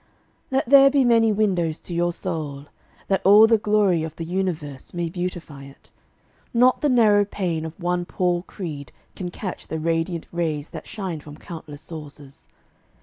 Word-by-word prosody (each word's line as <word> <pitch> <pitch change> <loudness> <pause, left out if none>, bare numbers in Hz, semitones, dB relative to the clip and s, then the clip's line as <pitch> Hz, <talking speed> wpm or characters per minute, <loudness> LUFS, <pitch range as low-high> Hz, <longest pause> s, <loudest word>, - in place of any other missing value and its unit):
Let 270 0 +1
there 275 +1 +8
be 275 -2 +3
many 230 -2 +4
windows 185 -7 0
to 175 - -7
your 175 +1 +1
soul, 155 -6 -5 0.4
That 195 - +1
all 205 +3 +8
the 225 -1 +4
glory 205 -5 +2
of 160 0 -5
the 165 - -5
universe 165 -6 -4
May 170 -1 -1
beautify 170 -5 -5
it. 135 0 -17 0.6
Not 250 +2 +4
the 295 - +2
narrow 215 -5 +5
pane 175 -5 -3
Of 160 +2 -8
one 175 0 -1
poor 175 -1 0
creed 155 -8 -7 0.2
can 180 -2 -4
catch 185 +1 -6
the 160 - -3
radiant 165 +1 -1
rays 160 -4 -2
That 160 -3 -9
shine 190 -7 -5
from 150 0 -12
countless 160 -4 -9
sources. 145 -4 -11
175 Hz, 165 wpm, -23 LUFS, 160-205 Hz, 0.6 s, there